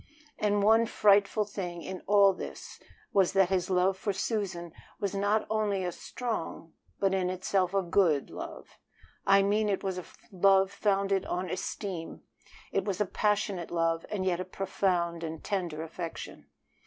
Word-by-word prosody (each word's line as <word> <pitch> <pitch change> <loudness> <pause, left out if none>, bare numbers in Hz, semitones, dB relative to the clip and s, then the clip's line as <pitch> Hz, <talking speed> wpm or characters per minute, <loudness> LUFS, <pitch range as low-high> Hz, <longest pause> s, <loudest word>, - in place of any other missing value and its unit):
And 205 -1 +2
one 225 +2 +5
frightful 205 0 +4
thing 180 -4 -5
in 190 -1 -6
all 200 -1 +6
this - - -8 0.3
was 195 -1 +3
that 195 -2 +4
his 190 -1 0
love 185 +1 +3
for 200 +2 -2
Susan 190 -5 -3 0.3
was 200 -1 -2
not 205 +2 +1
only 210 -3 0
a 180 - -1
strong 170 -6 -5 0.3
but 195 -1 +2
in 185 -1 +1
itself 185 0 0
a 195 - +2
good 170 -5 +2
love. - - -9 0.5
I 195 0 +6
mean 210 +2 +2
it 195 0 -1
was 190 -2 -2
a 180 - -9 0.3
love 195 0 +4
founded 195 -1 +1
on 180 +1 -2
esteem; 185 -3 -5 0.5
it 195 - +1
was 195 -2 -2
a 210 - +2
passionate 200 -3 0
love, 165 -1 0
and 195 -3 -2
yet 180 -2 +1
a - - -1
profound 180 -2 -1
and 160 -1 -5
tender 175 -6 -2
affection. 165 +1 -7
190 Hz, 160 wpm, -29 LUFS, 180-200 Hz, 0.5 s, all